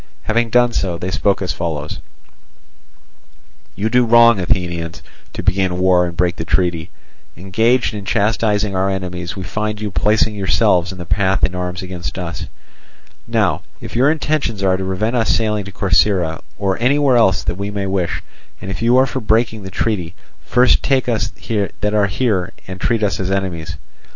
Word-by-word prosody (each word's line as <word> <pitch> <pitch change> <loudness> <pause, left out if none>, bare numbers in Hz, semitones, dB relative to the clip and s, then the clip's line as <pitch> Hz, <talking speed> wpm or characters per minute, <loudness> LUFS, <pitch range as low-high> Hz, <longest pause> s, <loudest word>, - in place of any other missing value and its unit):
Having 115 +1 +1
done 120 +1 +3
so, 90 -3 -1
they 90 +2 -4
spoke 100 +1 +1
as 90 - -2
follows: 75 -3 -4 1.8
"You 105 +3 -1
do 125 +2 +3
wrong, 115 -2 +6
Athenians, 85 -4 -2 0.3
to - - -5
begin 95 -2 +1
war 90 -1 +3
and 85 -1 -7
break 90 0 +1
the - - -3
treaty. 85 -1 0 0.5
Engaged 110 +8 +1
in 105 -1 -5
chastising 105 -1 +1
our 95 +1 +1
enemies, 90 -2 -4
we 95 - -5
find 105 +4 -3
you 105 -1 -4
placing 105 +3 +2
yourselves 95 -2 +2
in 95 - -9
our 90 - -7
path 95 +2 +1
in 90 - +2
arms 90 +1 -4
against 90 -1 -6
us. 85 -2 -5 0.8
Now - - +1 0.2
if - - -9
your 130 +4 +4
intentions 150 -9 -1
are 95 -1 +3
to 95 - -3
prevent 100 +6 -1
us 115 -2 +1
sailing 105 -3 +1
to 95 - -8
Corcyra, 90 -3 +1 0.2
or 95 -1 -1
anywhere 135 +2 +3
else 95 -7 +3
that - - -1
we 100 +3 -4
may 100 -1 -3
wish, 95 -2 -2 0.4
and 95 - -6
if 95 - -5
you 120 +2 +4
are 130 - +5
for 130 0 -3
breaking 110 -1 +1
the 95 - -7
treaty, 90 -3 -2 0.3
first 125 0 +3
take 135 -3 +1
us 110 -3 0 0.5
that 105 0 0
are 105 -1 +3
here 95 -3 -1
and 95 0 -8
treat 115 -2 +1
us 100 - 0
as 95 -1 -2
enemies." 85 -5 -3
95 Hz, 180 wpm, -18 LUFS, 90-110 Hz, 1.8 s, wrong